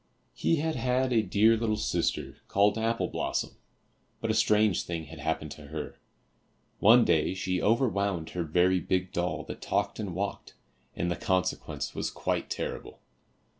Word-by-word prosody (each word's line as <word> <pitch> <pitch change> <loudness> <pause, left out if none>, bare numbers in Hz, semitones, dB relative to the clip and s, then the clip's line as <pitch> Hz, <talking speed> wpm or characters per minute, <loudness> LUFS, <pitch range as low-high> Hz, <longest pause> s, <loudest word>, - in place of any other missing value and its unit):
He 165 - +1
had 160 +1 -1
had 125 +1 +1
a 115 - +4
dear 110 +3 +4
little 110 -1 0
sister, 85 -5 -1
called 100 +1 +3
Apple 115 +1 0
blossom, - - -2 0.7
but - - -1
a - - +1
strange 105 -3 +3
thing 85 -2 -4
had 80 +1 -11
happened 80 0 -2
to 75 -2 -10
her. 75 +1 -6 0.8
One 115 +3 +7
day 85 +2 +2
she 95 -1 -1
over 115 +5 +3
wound 100 -6 -1
her 90 - -3
very 90 +3 +3
big 90 0 -1
doll 90 +1 -1
that - - -8
talked - - -1
and 100 -5 -4
walked, 100 +2 -4 0.4
and 85 +1 -1
the - - 0
consequence 95 -2 -1
was - - -2
quite - - -2
terrible. - - -5
95 Hz, 165 wpm, -29 LUFS, 85-110 Hz, 0.8 s, One